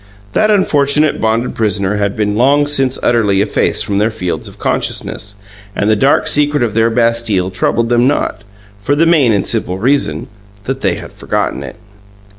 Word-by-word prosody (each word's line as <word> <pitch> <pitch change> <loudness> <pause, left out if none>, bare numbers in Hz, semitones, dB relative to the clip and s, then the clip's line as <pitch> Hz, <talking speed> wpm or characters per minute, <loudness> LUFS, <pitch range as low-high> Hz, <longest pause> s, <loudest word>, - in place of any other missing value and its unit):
That 215 - +2
unfortunate 150 -7 +2
bonded 115 +2 0
prisoner 105 -2 -1
had 100 -1 -1
been 105 -1 -1
long 140 +5 +3
since 135 -3 0
utterly 105 -5 +2
effaced 105 +1 0
from 100 -2 -1
their 105 +2 +2
fields 95 -6 -4
of - - -13
consciousness, 105 -1 -3 0.4
and 105 +1 +1
the - - +4
dark 135 +6 +2
secret 145 -1 +2
of 115 -3 -1
their 115 +1 +2
Bastille 115 -5 0
troubled 115 +5 0
them 120 +1 +3
not 145 -5 -1 0.4
for 140 +8 0
the 160 +3 +3
main 155 -8 +3
and 100 -2 0
simple 100 -5 -1
reason 105 - 0 0.4
that 135 +3 -4
they - - +1
had - - -10
forgotten - - -3
it. - - -8
115 Hz, 175 wpm, -14 LUFS, 105-140 Hz, 0.4 s, the